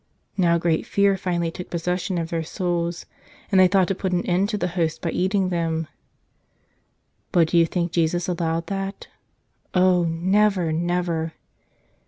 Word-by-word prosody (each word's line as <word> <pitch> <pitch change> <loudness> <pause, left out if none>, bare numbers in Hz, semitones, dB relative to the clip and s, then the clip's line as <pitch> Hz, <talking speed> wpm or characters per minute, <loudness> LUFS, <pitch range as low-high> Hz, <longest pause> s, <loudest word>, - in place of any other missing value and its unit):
Now 170 -3 +3
great 165 -1 0
fear 200 -1 +3
finally 175 -3 -1
took 180 - -8
possession 180 +2 -2
of 165 -1 -3
their 165 -1 -1
souls, 170 0 -2 0.5
and 190 - +5
they 185 - +7
thought 190 -1 +3
to - - +2
put 190 0 -3
an 175 - 0
end 185 +3 +1
to 215 - -1
the 180 -2 -1
Hosts 165 -2 -1
by 165 - -3
eating 190 0 +1
them. 165 -2 -1 1.4
But 165 -2 +3
do 170 - +4
you 165 - +4
think 170 0 -2
Jesus 170 +1 0
allowed 165 -2 -1
that? 195 0 -5 0.7
Oh, 180 -1 +4
never, 185 +1 +2
never! 170 -1 -1
175 Hz, 160 wpm, -23 LUFS, 165-185 Hz, 1.4 s, they